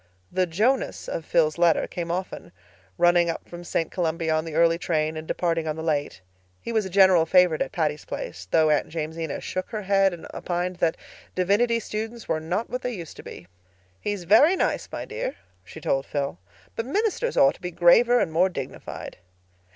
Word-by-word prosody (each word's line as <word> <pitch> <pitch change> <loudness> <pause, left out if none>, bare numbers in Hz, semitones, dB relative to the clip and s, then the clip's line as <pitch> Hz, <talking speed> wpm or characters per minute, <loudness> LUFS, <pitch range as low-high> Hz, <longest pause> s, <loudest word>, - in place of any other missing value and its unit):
The 185 -1 +1
"Jonas" 225 +10 0
of 160 - -4
Phil's 155 -1 +2
letter 170 -2 +4
came 170 -1 -5
often, 185 +2 -4 0.5
running 175 -1 +4
up 165 - -5
from 175 0 -9
St. 165 -1 -2
Columbia 165 -2 -1
on 155 +1 0
the 160 -2 -6
early 165 0 +4
train 155 -2 0
and 155 0 -7
departing 165 -2 -1
on 155 - -1
the 160 - -6
late. 145 - -1 0.4
He - - -6
was 220 -4 +1
a - - -8
general 185 -3 +5
favorite 180 -3 +4
at - - -1
Patty's 150 -3 -1
Place, 90 +1 -6
though 155 - +4
Aunt 150 - +1
Jamesina 160 -1 -4
shook 185 - -4
her 215 -2 -4
head 195 0 +3
and 175 -2 -9
opined 180 +1 -3
that 165 -2 +1 0.4
divinity 210 +6 +2
students 225 +2 -5
were 155 - 0
not 180 +8 -2
what 250 - -4
they 250 -1 -3
used 170 -5 -8
to - - -8
be. 90 - -10 0.5
"He's 205 -3 -3
very 225 - +6
nice, - - -1
my - - -5
dear," - - -4 0.3
she - - -11
told 135 0 -1
Phil, 140 - -3 0.4
"but 225 - -3
ministers 445 - -1
ought 275 0 +6
to - - -19
be 180 - -3
graver 180 +8 +5
and 165 - 0
more 175 +4 +3
dignified." 135 -8 -7
175 Hz, 195 wpm, -25 LUFS, 160-205 Hz, 0.5 s, very